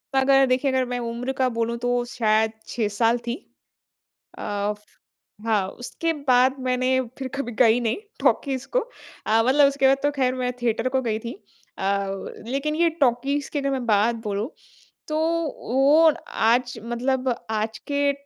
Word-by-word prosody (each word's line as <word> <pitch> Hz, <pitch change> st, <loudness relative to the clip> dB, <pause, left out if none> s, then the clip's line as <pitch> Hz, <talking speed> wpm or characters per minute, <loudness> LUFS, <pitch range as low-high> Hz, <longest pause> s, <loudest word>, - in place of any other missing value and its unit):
अगर 270 Hz, 0 st, +5 dB
देखिए 260 Hz, +2 st, +1 dB
अगर 260 Hz, -1 st, +1 dB
मैं 245 Hz, -, -2 dB
उम्र 235 Hz, +2 st, -3 dB
का 260 Hz, -, +3 dB
बोलूँ 230 Hz, +1 st, -1 dB
तो 245 Hz, 0 st, 0 dB
शायद 220 Hz, -2 st, +1 dB, 0.2 s
6 225 Hz, -3 st, -1 dB
साल 225 Hz, +3 st, +2 dB
थी। 235 Hz, -, -1 dB, 1.0 s
अ, -, -, -8 dB, 1.0 s
हाँ, 210 Hz, -4 st, +1 dB
उसके 325 Hz, +9 st, -3 dB
बाद 255 Hz, +1 st, +5 dB
मैंने 255 Hz, +1 st, +2 dB, 0.2 s
फिर 265 Hz, -, -4 dB
कभी 275 Hz, -3 st, -3 dB
गई 230 Hz, 0 st, +5 dB
नहीं 230 Hz, -2 st, 0 dB, 0.2 s
टॉकीज़ 270 Hz, -2 st, 0 dB
को, -, -, +6 dB, 0.5 s
अ 220 Hz, +1 st, +4 dB
मतलब 280 Hz, +2 st, +6 dB
उसके 275 Hz, -1 st, +2 dB
बाद 270 Hz, +1 st, +4 dB
तो 290 Hz, -, +3 dB
ख़ैर 260 Hz, -3 st, 0 dB
मैं 250 Hz, -1 st, -1 dB
थिएटर 235 Hz, +1 st, 0 dB
को 260 Hz, 0 st, 0 dB
गई 220 Hz, -3 st, -1 dB
थी। 230 Hz, +1 st, -6 dB, 0.4 s
अ, -, -, -5 dB, 0.6 s
लेकिन 280 Hz, +4 st, -1 dB
ये 335 Hz, +1 st, +3 dB
टॉकीज़ 275 Hz, +3 st, +1 dB
की 295 Hz, -, -1 dB
अगर 275 Hz, 0 st, -1 dB
मैं 260 Hz, -2 st, -2 dB
बात 220 Hz, +1 st, +3 dB
बोलूँ 210 Hz, +3 st, -2 dB, 0.6 s
तो 305 Hz, -, -1 dB, 0.6 s
वो 295 Hz, +5 st, +6 dB, 0.2 s
आज 245 Hz, +2 st, +1 dB
मतलब 250 Hz, +2 st, -1 dB
आज 220 Hz, 0 st, -2 dB
के 285 Hz, 0 st, +2 dB
250 Hz, 160 wpm, -24 LUFS, 230-270 Hz, 1.0 s, को